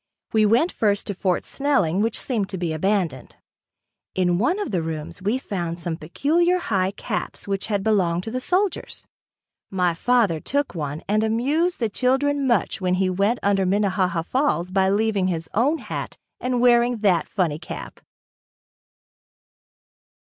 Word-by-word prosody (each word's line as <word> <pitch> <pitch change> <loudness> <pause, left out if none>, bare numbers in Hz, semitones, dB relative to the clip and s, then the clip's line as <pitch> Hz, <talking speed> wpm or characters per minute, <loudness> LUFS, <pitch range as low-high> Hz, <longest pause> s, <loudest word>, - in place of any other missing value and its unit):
We 215 -1 +4
went 245 - +3
first 205 -2 0
to 205 - -3
Fort 185 -1 -1
Snelling 200 - +1
which 225 +1 +1
seemed 215 -7 -2
to 190 - -4
be 170 -3 -2
abandoned. 170 -6 -1 0.8
In 180 -1 +2
one 250 - +2
of 415 - -3
the 180 -4 0
rooms 160 +3 -5
we 210 +6 +1
found 175 -9 -4
some 170 -1 -3
peculiar 320 - +1
high 190 - 0
caps 200 - -5
which 195 -1 -1
had 205 -3 -1
belonged 180 -5 +1
to 225 - -5
the 255 - -2
soldiers. 370 +7 -1 0.6
My 180 -3 +1
father 210 -3 +2
took 285 - -1
one 150 -3 -4
and 215 +2 +2
amused 280 +11 +1
the 230 - +1
children 270 +5 +1
much 235 -3 +1
when 180 -1 +1
he 185 0 +1
went 200 +6 +1
under 195 -1 +2
Minnehaha 185 -3 +1
Falls 185 - 0
by 190 0 +3
leaving 205 -2 +1
his 165 -3 -2
own 275 +9 +2
hat - - -6 0.2
and 250 -1 -1
wearing 240 0 +4
that 185 -6 +2
funny 165 -7 -1
cap. 155 - -8
200 Hz, 155 wpm, -23 LUFS, 180-245 Hz, 0.8 s, We